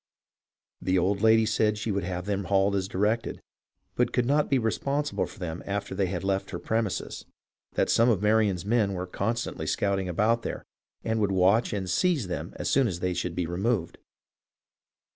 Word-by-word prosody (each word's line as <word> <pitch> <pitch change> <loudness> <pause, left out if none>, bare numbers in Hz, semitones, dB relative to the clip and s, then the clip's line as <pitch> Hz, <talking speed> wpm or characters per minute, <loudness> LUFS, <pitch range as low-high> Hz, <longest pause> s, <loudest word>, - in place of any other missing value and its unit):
The 95 0 +1
old 95 +3 +1
lady 110 0 +5
said 105 -1 +1
she 110 +1 -2
would 100 -1 -1
have 90 0 -4
them 100 -1 -2
hauled 100 +2 +2
as 95 -1 -1
directed, 105 +4 -1 0.5
but - - +1
could 125 - +1
not 145 +3 +2
be 135 - +3
responsible 140 +5 -1
for - - -14
them 85 -2 -5
after 100 0 -3
they 95 -1 -1
left 95 +1 -1
her - - -4
premises; 110 -3 -2 0.5
that - - +1
some 115 +2 +4
of 110 -6 +3
Marion's 105 -3 +2
men 105 -2 +2
were 90 -1 -3
constantly 100 -3 -3
scouting 95 0 0
about 110 +6 +2
there, - - -5 0.4
and 110 0 0
would 100 -2 +1
watch 95 +5 +3
and 100 -3 -3
seize 130 - +1
them 90 - -4
as - - -4
soon 135 -3 +3
as 85 -5 -3
they 90 0 -1
should 90 -1 -3
be 90 - -1
removed. 90 +2 -1
100 Hz, 180 wpm, -27 LUFS, 95-110 Hz, 0.5 s, lady